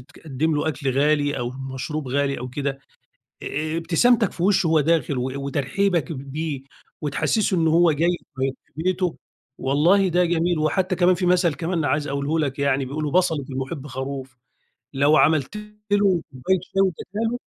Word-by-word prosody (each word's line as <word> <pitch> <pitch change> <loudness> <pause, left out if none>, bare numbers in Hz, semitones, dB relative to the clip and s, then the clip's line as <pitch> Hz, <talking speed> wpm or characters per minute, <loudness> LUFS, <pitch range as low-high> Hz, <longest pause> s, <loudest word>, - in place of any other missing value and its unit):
تِقَدّم 150 +4 -3
له 150 +2 0
أكل 145 -3 -2
غالي 145 +1 +1
أو 120 -1 -2 0.2
مَشْروب 150 +2 -4
غالي 140 +1 0
أو 125 - -6
كده 135 +1 -3 0.6
آآ، 155 +3 -3
ابتسَامْتك 185 +7 +3
في 170 - -6
وِشّه 190 -2 +3
وهو 160 -1 +4
دَاخِل 155 -2 +1
و 125 +1 -2 0.2
وترحيبك 150 +4 0
بيه 140 +1 -5 0.4
وتحسُّسه 185 +7 0
إنه 160 -1 +2
هو 170 0 +5
جاي 170 +4 +1 0.2
في 135 0 0
في - - -36
بيته، 185 -1 0 0.4
والله 170 +9 +3
ده 180 +1 +2
جَميل 170 0 +1
وحتى 180 +5 0
كَمَان 180 +1 +4
في 180 +1 -2
مَثلْ 175 -3 +3
كَمَان 165 -1 -2
عايز 145 0 0
أقوله 140 +3 -1
لك 140 -3 -1
يعني، 140 -1 +1
بيقولوا 150 +3 -3
"بَصَلة 170 -6 +2
المُحِبّ 135 +2 -5
خَروف"، 135 0 -6 0.6
لو 145 +3 +4
عَملْت 155 +3 +2 0.4
له 200 -4 +3
كوباية 135 +9 0
شاي 195 +1 -1
وإدّيتها 195 +3 -2
له 245 - -3
155 Hz, 165 wpm, -23 LUFS, 140-175 Hz, 0.6 s, هو